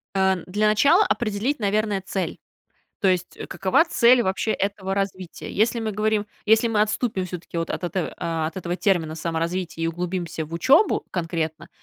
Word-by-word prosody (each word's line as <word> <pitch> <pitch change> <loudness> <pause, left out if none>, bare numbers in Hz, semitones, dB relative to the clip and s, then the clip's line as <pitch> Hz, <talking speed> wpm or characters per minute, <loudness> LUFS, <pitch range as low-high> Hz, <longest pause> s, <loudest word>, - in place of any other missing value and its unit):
А, 190 -1 +3
для 210 +4 +1
начала 285 - +5
определить, 235 +5 -1
наверное, 210 -1 0
цель, 190 -1 -3 0.6
то 195 - +3
есть, 180 -1 0
какова 195 - +2
цель 245 -6 +5
вообще 190 +3 -1
этого 195 -1 -2
развития. 190 -3 -4
Если 225 +3 +2
мы 220 -1 -2
говорим, 215 0 0 0.2
если 220 +2 +4
мы 215 -2 +1
отступим 210 -2 0
всё-таки 175 -1 -6
от 165 - -2
это 180 0 -3 0.3
от 165 - -6
этого 175 -1 -3
термина 175 -6 +1
"саморазвитие" 165 +1 -3
и - - +2
углубимся 170 -2 -3
в 160 - -15
учебу 275 - +4
конкретно, 165 -3 -3
190 Hz, 155 wpm, -23 LUFS, 175-215 Hz, 0.6 s, начала